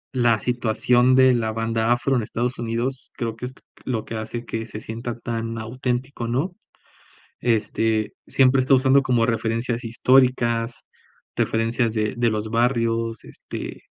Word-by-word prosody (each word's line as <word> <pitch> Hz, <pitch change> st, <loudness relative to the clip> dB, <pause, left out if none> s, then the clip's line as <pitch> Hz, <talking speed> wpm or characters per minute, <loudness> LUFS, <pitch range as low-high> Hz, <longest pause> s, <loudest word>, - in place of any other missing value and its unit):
la 120 Hz, -3 st, +3 dB
situación 125 Hz, +2 st, +2 dB
de 130 Hz, 0 st, +6 dB
la 115 Hz, -2 st, 0 dB
banda 115 Hz, +1 st, 0 dB
afro 120 Hz, +3 st, +2 dB
en 120 Hz, -, +2 dB
Estados 120 Hz, +3 st, -3 dB
Unidos. 120 Hz, +3 st, -2 dB
Creo 115 Hz, -2 st, -3 dB
que 125 Hz, -, -6 dB
es 125 Hz, -, -6 dB, 0.3 s
lo 115 Hz, -4 st, -2 dB
que -, -, -7 dB
hace 110 Hz, +2 st, -5 dB
que 115 Hz, 0 st, -4 dB
se 105 Hz, -, -7 dB
sienta 115 Hz, +2 st, -6 dB
tan 115 Hz, -1 st, -4 dB
auténtico, 125 Hz, +2 st, -3 dB
¿no? 140 Hz, +10 st, -1 dB, 0.8 s
Este, 110 Hz, -1 st, 0 dB
siempre 130 Hz, 0 st, +4 dB
está 135 Hz, +2 st, +3 dB
usando 135 Hz, +1 st, +5 dB
como 120 Hz, -3 st, +2 dB
referencias 115 Hz, +1 st, -1 dB
históricas, 120 Hz, -1 st, +2 dB, 0.5 s
referencias 115 Hz, +1 st, 0 dB
de 110 Hz, +1 st, -1 dB
de 120 Hz, -1 st, +2 dB
los 110 Hz, 0 st, -3 dB
barrios, 115 Hz, -1 st, 0 dB
este, -, -, -8 dB
115 Hz, 145 wpm, -23 LUFS, 115-125 Hz, 0.8 s, de